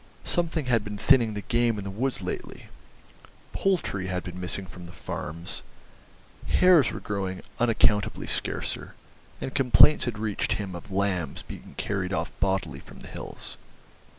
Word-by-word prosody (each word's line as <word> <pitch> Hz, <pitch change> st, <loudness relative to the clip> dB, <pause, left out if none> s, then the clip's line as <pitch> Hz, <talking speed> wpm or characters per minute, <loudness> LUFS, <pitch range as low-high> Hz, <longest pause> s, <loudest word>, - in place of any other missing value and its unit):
Something 170 Hz, -4 st, 0 dB
had 115 Hz, -4 st, +2 dB
been 105 Hz, 0 st, -5 dB
thinning 115 Hz, -2 st, +4 dB
the 105 Hz, -, -3 dB
game 120 Hz, -3 st, +2 dB
in 100 Hz, -, -4 dB
the 100 Hz, -, -4 dB
woods 125 Hz, +6 st, -1 dB
lately, -, -, -5 dB, 0.8 s
poultry 165 Hz, -, 0 dB
had 90 Hz, -1 st, -2 dB
been 90 Hz, 0 st, -7 dB
missing 90 Hz, +2 st, -1 dB
from 90 Hz, -1 st, -10 dB
the -, -, -10 dB
farms, 85 Hz, -1 st, -5 dB, 0.9 s
hares 180 Hz, -8 st, +6 dB
were -, -, -5 dB
growing 95 Hz, -2 st, -3 dB, 0.2 s
unaccountably 110 Hz, -3 st, +3 dB
scarcer, -, -, -2 dB, 0.4 s
and 130 Hz, -, -4 dB
complaints 140 Hz, +2 st, +6 dB
had 120 Hz, -4 st, -2 dB
reached 105 Hz, -2 st, 0 dB
him 100 Hz, -3 st, -3 dB
of 85 Hz, +4 st, -8 dB
lambs 95 Hz, -6 st, -1 dB
being -, -, -10 dB
carried 95 Hz, -2 st, -1 dB
off 85 Hz, 0 st, -1 dB
bodily 95 Hz, -1 st, 0 dB
from -, -, -13 dB
the -, -, -10 dB
hills. -, -, -7 dB
100 Hz, 150 wpm, -27 LUFS, 95-120 Hz, 0.9 s, hares